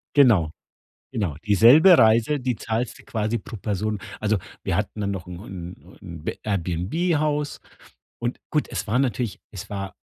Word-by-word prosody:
Genau, 105 - +5 0.6
genau. 95 -10 -2
Dieselbe 130 - +7
Reise, 115 +6 +4
die 125 -2 -1
zahlst 115 +2 -3
du - - -15
quasi 110 +1 -1
pro 115 - -9
Person. 105 +1 -2 0.2
Also, 105 -1 +1 0.3
wir - - -1
hatten 105 - -2
dann 100 0 -1
noch 95 -2 -5
'n 90 -1 -8
'n 90 -2 -10
'n 85 -2 -9
B - - -3
Airbnb-Haus 145 - -1 0.6
und 120 +1 -3
gut, 150 - +1
es 100 -5 -4
war 120 +5 +1
natürlich 125 -4 -1
es 95 -4 -8
war 95 -2 -5
110 Hz, 160 wpm, -24 LUFS, 95-125 Hz, 0.6 s, Dieselbe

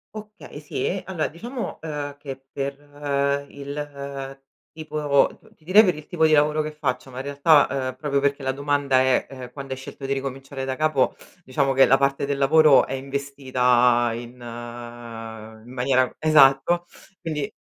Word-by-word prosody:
Okay, 210 -8 -10
sì, 150 - -4
e 190 +1 -1
allora 180 -5 -1
diciamo, 235 - -6
ehm, 145 -2 -5
che 135 -2 -9
per 140 0 -4 0.7
il 140 -1 -7 0.3
tipo 150 -3 +1 0.2
t - - -25
ti - - -29
direi 190 +7 +7
per 180 -6 +2
il 150 0 -10
tipo 160 -3 +2
di 155 - +3
lavoro 150 +1 +3
che 155 0 -4
faccio, 140 -3 -3
ma 125 - -11
in 130 - -4
realtà, 140 +2 +4 0.2
ehm, 130 - -7
proprio 140 +1 -1
perché 140 0 0
la 130 - 0
domanda 140 -1 +1
è, 130 0 +2
ehm, 130 -2 -9
quando 135 0 -6
hai 130 - -7
scelto 135 +1 -9
di 135 - 0
ricominciare 135 0 -5
da 130 0 -2
capo, 155 -3 +1 0.3
diciamo 135 0 0
che 135 0 +6
la 135 - +5
parte 140 0 0
del 140 -1 -1
lavoro 150 +1 +6
è - - -5
investita 130 -3 +1
in 120 +1 -7 1.3
in 125 - -12
maniera 130 0 +1
esatto, 155 +3 +4 0.3
quindi 150 -3 -4
140 Hz, 170 wpm, -23 LUFS, 135-150 Hz, 1.3 s, direi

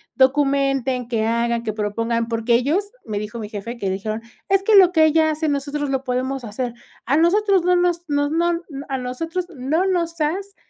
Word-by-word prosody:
documenten, 270 -2 +2
que 225 -3 0
hagan, 235 +1 0
que 215 -2 -2
propongan". 230 +2 -1
Porque 230 0 +1
ellos, 320 +12 0
me 210 -2 -3
dijo 210 +3 -6
mi 210 -2 -6
jefe 220 +3 -6
que 200 - -3
le 190 - 0
dijeron: 215 +3 -4 0.3
"Es 390 0 +3
que 430 +1 +4
lo 375 -3 +8
que 320 -3 +5
ella 315 0 +3
hace, 310 +1 -2
nosotros 285 0 -2
lo 270 -1 -1
podemos 255 +1 -2
hacer". 235 +3 -4 0.3
"A 280 - +2
nosotros 385 +3 +3
no 360 +1 +3
nos 350 -1 +1
nos 290 0 +1
no 340 +1 +1 0.3
a 270 - -1
nosotros 325 +8 -4
no 300 +6 0
nos 340 -3 -1
has, 385 +6 -2
275 Hz, 195 wpm, -21 LUFS, 235-335 Hz, 0.3 s, lo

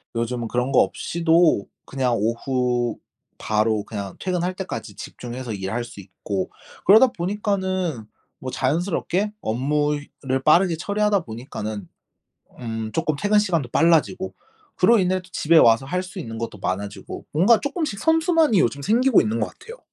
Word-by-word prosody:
요즘은 115 0 -2
그런 125 +3 -1
거 130 - +5
없이도 165 - +2 0.2
그냥 130 -3 0
오후 120 +1 -1 0.4
바로 110 -1 0
그냥 100 -3 -6
퇴근할 180 0 -2
때까지 115 - -6
집중해서 120 +3 -7
일할 100 +4 -3
수 115 -3 -11
있고 95 0 -5 0.4
그러다 220 +7 +8
보니까는 185 - -2 0.3
뭐 130 - -5
자연스럽게 175 +8 -1
업무 145 +6 0
효 - - -4 0.2
를 130 0 -1
빠르게 170 +2 +4
처리하다 205 +2 +1
보니까는 110 - -6 0.7
음 110 -2 -4
조금 155 - 0
퇴근 205 +8 +2
시간도 170 - 0
빨라지고 170 +3 +2 0.4
그로 215 +4 +5
인해 185 0 +1
또 185 - -19
집에 165 +2 +3
와서 115 -1 +5
할 180 +6 -2
수 185 +1 -9
있는 115 -8 -6
것도 115 -2 -5
많아지고 100 +3 -5
뭔가 195 +9 +4
쪼끔씩 285 - -3
선순환이 320 - +3
요즘 140 +2 +1
생기고 240 - +4
있는 110 +1 -1
것 - - 0
같아요. 460 +2 -12
150 Hz, 335 characters per minute, -23 LUFS, 115-190 Hz, 0.7 s, 그러다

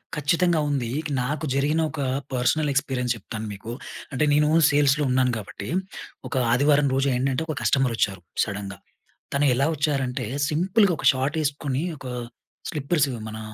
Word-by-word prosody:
ఖచ్చితంగా 165 +3 +2
ఉంది. 130 -5 -1 0.3
నాకు 140 +4 -2
జరిగిన 150 +4 +2
ఒక 150 - -4 0.3
పర్సనల్ 145 +5 +1
ఎక్స్పీరియన్స్ 130 -4 0
చెప్తాను 110 +1 -6
మీకు. 100 +3 -8 0.4
అంటే 140 +3 +1
నీను 150 +1 +4 0.2
సేల్స్‌లో 145 0 +3
ఉన్నాను 125 0 +3
గాబట్టి, 100 0 -7 0.6
ఒక - - -5 0.2
ఆదివారం 140 +3 +4
రోజు 135 +1 +2
ఏంటంటే, 130 +3 0
ఒక - - -9
కస్టమరొచ్చారు 115 -8 +1 0.2
సడెన్‌గా. 100 -2 -5 0.6
తను 145 +1 +3
ఎలా 140 +4 +2
వచ్చారంటే, 135 -4 -1 0.2
సింపుల్‌గా 185 +5 +3
ఒక - - -4
షార్ట్ 135 +5 -1
ఏసుకుని 140 -1 -1
ఒక 135 - -10 0.6
స్లిప్పర్స్ 150 +1 +1
ఇవి 120 -3 -5
మన, 110 0 -7
140 Hz, 140 wpm, -24 LUFS, 125-150 Hz, 0.6 s, నీను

